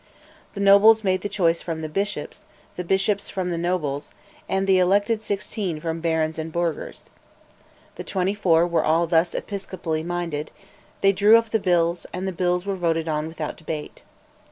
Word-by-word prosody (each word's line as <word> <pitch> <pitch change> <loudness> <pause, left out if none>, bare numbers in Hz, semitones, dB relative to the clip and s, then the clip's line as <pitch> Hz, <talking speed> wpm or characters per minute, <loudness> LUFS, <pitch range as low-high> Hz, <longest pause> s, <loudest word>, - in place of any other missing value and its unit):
The - - -5
nobles 205 +3 +6
made 185 -1 +1
the 205 - -3
choice 170 -5 +1
from 160 -2 -5
the - - -2
bishops, 200 +6 -4 0.3
the 180 - -4
bishops 195 +3 0
from 185 -2 -3
the 170 - -2
nobles, 160 -5 -2 0.3
and 190 0 0
the 190 -1 +4
elected 205 +4 +2
sixteen 200 -4 -3
from 165 +1 -3
the - - -9
barons 160 -1 0
and 160 +1 -5
burghers. 170 -1 -3 0.9
The - - -5
twenty 190 +1 -1
four 175 -5 +3
were 170 -1 +1
all 165 +2 +2
thus 165 0 +1
episcopally 185 -5 -4
minded: 170 -3 -3 0.5
they 195 - +5
drew 205 +3 +6
up 230 -1 -2
the 220 - +2
bills, 175 -2 +1
and 185 +1 -3
the - - -1
bills 180 0 0
were 200 -1 -2
voted 165 -2 -1
on 155 0 -1
without 160 -2 -5
debate. 155 -2 -6
175 Hz, 180 wpm, -23 LUFS, 165-195 Hz, 0.9 s, nobles